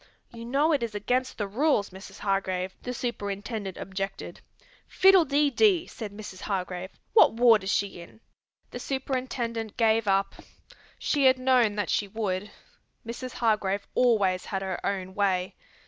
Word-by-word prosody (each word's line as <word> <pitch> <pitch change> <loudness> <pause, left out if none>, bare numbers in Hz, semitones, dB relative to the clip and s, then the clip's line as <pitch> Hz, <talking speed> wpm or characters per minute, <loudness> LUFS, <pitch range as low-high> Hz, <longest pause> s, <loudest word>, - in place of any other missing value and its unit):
"You 230 0 -9
know 280 +6 +2
it 290 -4 +2
is 230 -3 -4
against 250 +5 -1
the 210 - -1
rules, 220 -1 +1
Mrs. 190 +2 -11
Hargrave," 190 -2 -1
the 250 - -5
superintendent 205 -4 -4
objected. 195 +1 -5 0.5
"Fiddle 380 -3 +5
dee 290 0 +2
dee!" 365 - +3
said 220 - -8
Mrs. 205 -2 -9
Hargrave. 185 -2 -3 0.2
"What 440 - +6
ward 230 -3 +5
is 190 - -1
she 200 -3 -1
in?" 170 - -14 0.5
The - - -6
superintendent 255 -5 -3
gave 225 -2 +2
up. 195 0 +2 0.6
She 285 -2 +1
had 260 0 +6
known 255 -5 +3
that 205 -1 -1
she 205 - 0
would. 200 -1 -3 0.6
Mrs. 240 +2 -6
Hargrave 205 -3 0
always 200 -7 +2
had 195 -1 -3
her 190 -2 -4
own 190 -2 -3
way. 190 -2 0
215 Hz, 150 wpm, -27 LUFS, 195-250 Hz, 0.6 s, What